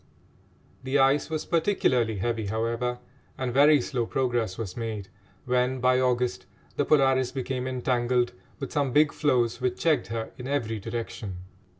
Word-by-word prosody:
The 135 +2 0
ice 135 +2 +3
was 155 -1 -3
particularly 130 - +1
heavy, 110 +2 -2
however, 115 +3 -1 0.4
and 125 -2 -2
very 145 +2 +6
slow 120 -2 -2
progress 120 -7 -1
was 105 -6 -5
made 110 -5 -5 0.4
when, 125 +1 +1
by 125 0 +3
August, 125 -7 0 0.3
the 145 - +1
Polaris 135 -3 +3
became 130 -1 -3
entangled 125 -1 0 0.3
with 135 - -5
some 140 -4 0
big 150 +1 +5
floes 125 -5 +1
which 125 -1 0
checked 155 - +2
her 110 +1 -4
in 125 - -6
every 115 -6 -1
direction. 110 -3 -5
125 Hz, 145 wpm, -27 LUFS, 115-135 Hz, 0.4 s, very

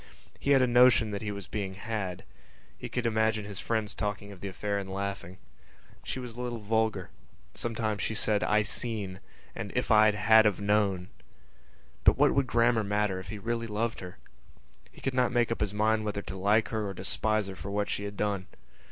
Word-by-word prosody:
He - - -3
had 135 -2 +6
a - - +5
notion 120 -3 +5
that 100 - -4
he 105 -1 -3
was 100 -2 -7
being 95 -3 -4
had. 100 -3 -4 0.5
He - - -7
could 125 -1 -2
imagine 110 -1 +1
his 100 -3 -6
friends 110 -2 -1
talking 105 -1 -4
of 100 - -11
the 100 - -5
affair 100 +1 -2
and 95 -1 -6
laughing. 100 -2 -4 0.7
She - - -4
was 125 -2 -6
a 120 - -7
little 120 -1 -3
vulgar; 110 -2 -1 0.4
sometimes 110 -3 -2
she 110 - -1
said 105 -1 +2
"I 105 0 +3
seen" 105 -4 -2 0.3
and - - -6
"If - - 0
I 110 0 +7
had've 105 -1 +4
known." 100 -3 +1 0.9
But - - +5
what - - +4
would 140 -2 +1
grammar 115 -2 +3
matter 105 -2 0
if 95 - -10
he 105 - -6
really 115 +2 -3
loved 115 +2 -2
her? 90 -1 -9 0.7
He - - -16
could 135 - -1
not 125 -1 +2
make 120 -2 +2
up 115 - -2
his 105 -2 0
mind 110 +1 +1
whether 105 -1 -3
to - - -7
like 105 +4 +2
her 110 -2 -2
or 95 - -5
despise 110 +3 0
her 95 - -7
for 95 +3 -7
what 100 0 -1
she 100 - -3
had 100 0 -7
done. 100 -3 -1
105 Hz, 205 wpm, -29 LUFS, 100-115 Hz, 0.9 s, I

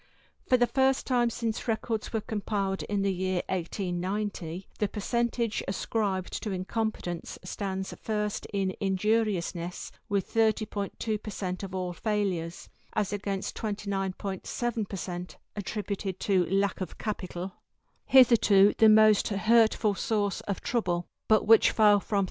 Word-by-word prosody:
For 255 - +5
the 245 - +4
first 265 +1 +2
time 245 -2 +2
since 230 -1 -2
the - - -10
records 225 -1 -2
were 220 - -1
compiled 200 -2 -2
in 205 -1 -1
the 195 -1 +1
year 185 0 -1
1890, 185 0 -3
the 210 - +2
percentage 235 +2 -1
ascribed 190 -1 -2
to 215 - -3
incompetence 185 -2 -3
stands 190 0 -4
first 210 -1 -2
in 195 -2 -1
injuriousness 190 -3 0 0.2
with 200 -2 -1
30.2 215 -1 0
per 215 - -7
cent 185 -3 -4
of 190 -1 -6
all 180 -1 -2
failures, 190 -5 -2 0.3
as 210 -2 0
against 200 -1 -3
29.7 200 +1 -3
per 195 - -4
cent 180 0 -6 0.2
attributed 200 -2 -4
to 185 -4 +2
lack 195 0 +1
of 185 - -5
capital, 185 -3 -4 0.5
hitherto 220 -6 +6
the 220 - +8
most 215 -1 +6
hurtful 220 +1 +3
source 205 0 -1
of 200 - -2
trouble, 175 -8 -1 0.2
but 215 -1 +4
which 225 +1 +7
fell 210 -2 +5
from 205 +1 -2
31. - - +4
205 Hz, 135 wpm, -28 LUFS, 190-220 Hz, 0.5 s, the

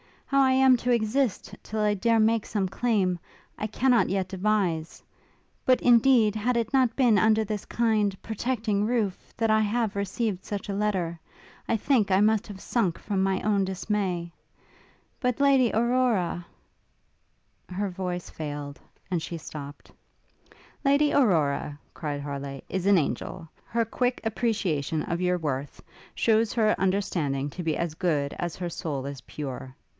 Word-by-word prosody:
How 275 0 +2
I 260 -1 +4
am 260 -1 +5
to 245 +1 -1
exist 230 -3 0
till 215 0 -4
I 210 0 +3
dare 230 +3 +2
make 220 0 +2
some 200 -3 -1
claim, 195 -4 0 0.4
I 215 - -2
cannot 245 +2 +2
yet 190 0 -1
devise: 185 -5 -1 0.6
but, 255 -1 +4
indeed, 235 -3 +5
had 235 +3 0
it 230 -2 -1
not 255 -4 +3
been 240 -6 +4
under 220 0 +4
this 210 -1 -4
kind, 215 -4 +1
protecting 220 -2 -1
roof, 220 -6 -2
that 225 -1 +2
I 220 - +4
have 215 0 0
received 200 -1 -2
such 205 -1 -5
a - - -1
letter 190 -5 -1 0.5
I - - +2
think 225 -2 +2
I 190 +1 +4
must 215 0 +2
have 195 -2 -9
sunk 195 -9 0
from 200 -2 -2
my 190 0 +1
own 205 -2 +2
dismay: 190 -3 -2 0.9
but 250 -2 0
Lady 270 -4 +5
Aurora 225 -7 +1 0.6
' - - -44
Her 200 0 0
voice 180 -1 -4
failed, 145 -2 -6 0.3
and 175 -3 0
she 170 +2 -5
stopt. 145 -2 -9 0.9
'Lady 285 +1 +4
Aurora,' 155 - +2 0.2
cried 145 -3 -4
Harleigh, 140 -1 -5
'is 190 0 -2
an 200 -1 +6
angel. 165 +2 -2 0.2
Her 230 0 0
quick 245 +3 -1
appreciation 200 - -1
of 170 +1 -3
your 180 0 +2
worth, 140 -4 -4 0.3
shews 225 -1 +2
her 215 -2 +3
understanding 170 -8 0
to 180 - -6
be 160 -2 0
as 170 -2 -2
good 150 -5 0
as 175 -2 -3
her 175 -1 -4
soul 145 -5 -4
is 140 -1 -6
pure. 130 -3 -7
200 Hz, 155 wpm, -26 LUFS, 170-230 Hz, 0.9 s, an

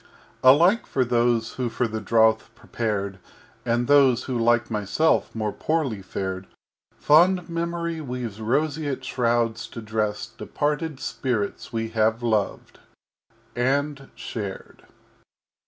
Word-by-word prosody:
_] - - -30
XI 130 - -1
Alike 175 - +5
for 130 - +1
those 120 -1 +1
who 125 -2 -2
for 120 +1 -1
the 110 0 -4
Drouth 110 +1 +3
prepared 100 -5 -3 0.5
And 120 +1 +1
those 135 -3 +5
who, 130 - -4
like 120 0 +2
myself, 110 +10 +1
more 110 -2 -1
poorly 140 -10 -1
fared, 95 0 -5 0.5
Fond 175 +4 +4
Memory 170 -1 -3
weaves 125 -6 -5
Roseate 140 +3 -1
Shrouds 120 -2 0
to 120 - -9
dress 110 -1 -2
Departed 150 0 -3
Spirits 115 -9 -3
we 115 -1 -2
have 110 +1 +1
loved 110 -4 -1 0.8
and 135 +3 -1
shared. 100 -4 -7
120 Hz, 120 wpm, -24 LUFS, 110-145 Hz, 0.8 s, Alike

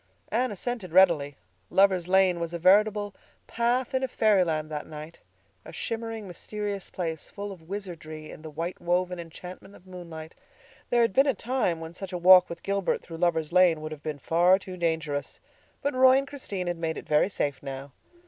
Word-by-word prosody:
Anne 245 +2 0
assented 205 -2 -5
readily. 165 -6 +4 0.3
Lovers' 190 -3 +3
Lane 185 -1 +4
was 170 0 -3
a - - -1
veritable 205 +3 +3 0.3
path 240 +2 0
in 260 - +1
a 265 - 0
fairyland 180 -10 +2
that 150 -1 -5
night—a 155 +1 -13
shimmering, 225 -2 -4
mysterious 205 +2 -5
place, 165 -4 -4
full 205 0 -6
of 170 -3 -13
wizardry 160 -6 -7
in - - -11
the 160 - -8
white 165 +4 -5
woven 180 +1 0
enchantment 180 +4 -10
of 180 - -18
moonlight. 170 -4 -9 0.6
There 240 -1 +4
had 230 - +1
been 270 +6 +4
a 275 - +2
time 235 -9 -1
when 165 0 -8
such 190 +1 -8
a - - -1
walk 180 +1 +7
with 170 0 -8
Gilbert 200 -1 -1
through 165 - -9
Lovers' 165 -2 0
Lane 180 -3 +5
would 155 0 -6
have 155 -2 -8
been 155 -2 -4
far 175 +6 +4
too 185 -1 -9
dangerous. 160 -5 -2 0.4
But 285 - 0
Roy 260 0 +6
and 275 0 -1
Christine 210 -10 -5
had 175 -1 -2
made 160 -1 -2
it - - -7
very 150 +5 +3
safe 145 -8 -2
now. 135 0 -7
180 Hz, 185 wpm, -27 LUFS, 160-205 Hz, 0.6 s, walk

